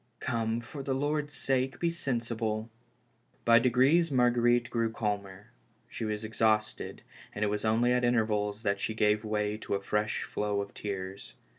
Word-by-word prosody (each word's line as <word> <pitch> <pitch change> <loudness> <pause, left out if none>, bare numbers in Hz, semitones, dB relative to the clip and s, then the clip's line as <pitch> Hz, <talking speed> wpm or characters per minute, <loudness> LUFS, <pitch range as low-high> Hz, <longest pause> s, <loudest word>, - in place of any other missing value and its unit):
Come, 115 0 -1
for 140 +4 -8
the 135 -1 -1
Lord's 145 +1 -1
sake, 130 0 0
be 170 -1 +1
sen 135 -8 -1
sible." 110 -1 -3 0.8
By 115 0 +7
degrees 130 +7 +4
Marguerite 120 -1 +3
grew 115 -1 0
calmer; 105 -1 -4 0.4
she 115 - -5
was 105 0 -3
ex 110 +1 -9
hausted, 110 -1 +1 0.3
and 105 - 0
it - - +1
was 105 0 -2
only 115 +3 +3
at 125 0 +1
intervals 110 -3 +1
that 100 -2 +1
she 110 - -2
gave 105 0 +2
way 105 -1 -1
to 110 - -3
a - - 0
fresh 105 +2 -1
flow 105 -1 -2
of 100 0 -5
tears. 95 -1 -6
110 Hz, 170 wpm, -30 LUFS, 105-125 Hz, 0.8 s, By